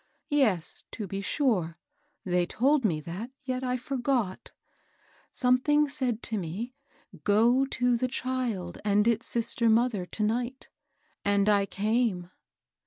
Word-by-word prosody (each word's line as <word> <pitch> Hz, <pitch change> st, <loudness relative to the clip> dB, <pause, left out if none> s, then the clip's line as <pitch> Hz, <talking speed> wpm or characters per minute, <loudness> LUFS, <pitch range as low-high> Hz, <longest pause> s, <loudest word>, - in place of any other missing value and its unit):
— -, -, -55 dB, 0.2 s
yes, 180 Hz, -7 st, -2 dB
to 215 Hz, -, -5 dB
be 195 Hz, +1 st, -4 dB
sure! 195 Hz, -, 0 dB, 0.5 s
they 180 Hz, -1 st, +2 dB
told 270 Hz, +9 st, +2 dB
me 170 Hz, -8 st, +1 dB
that; 175 Hz, +10 st, -6 dB
yet 255 Hz, 0 st, -3 dB
I 250 Hz, 0 st, 0 dB
forgot! 250 Hz, -6 st, -2 dB, 0.8 s
Some 250 Hz, -1 st, +3 dB
thing 295 Hz, +2 st, +3 dB
said 255 Hz, -6 st, -2 dB
to 220 Hz, -2 st, -2 dB
me, 195 Hz, +9 st, -5 dB, 0.2 s
' -, -, -31 dB, 0.2 s
Go 235 Hz, +6 st, +4 dB
to 245 Hz, -2 st, +1 dB
the 255 Hz, +2 st, 0 dB
child 245 Hz, -9 st, -3 dB
and 210 Hz, +1 st, +3 dB
its 230 Hz, 0 st, +1 dB
sister 235 Hz, 0 st, +1 dB
mother 220 Hz, -5 st, +2 dB
to 215 Hz, -, -3 dB
night,' 240 Hz, +4 st, -2 dB, 0.3 s
— -, -, -41 dB
and 200 Hz, 0 st, +2 dB
I 200 Hz, -1 st, +3 dB
came." 205 Hz, -4 st, 0 dB
230 Hz, 150 wpm, -28 LUFS, 200-255 Hz, 0.8 s, Go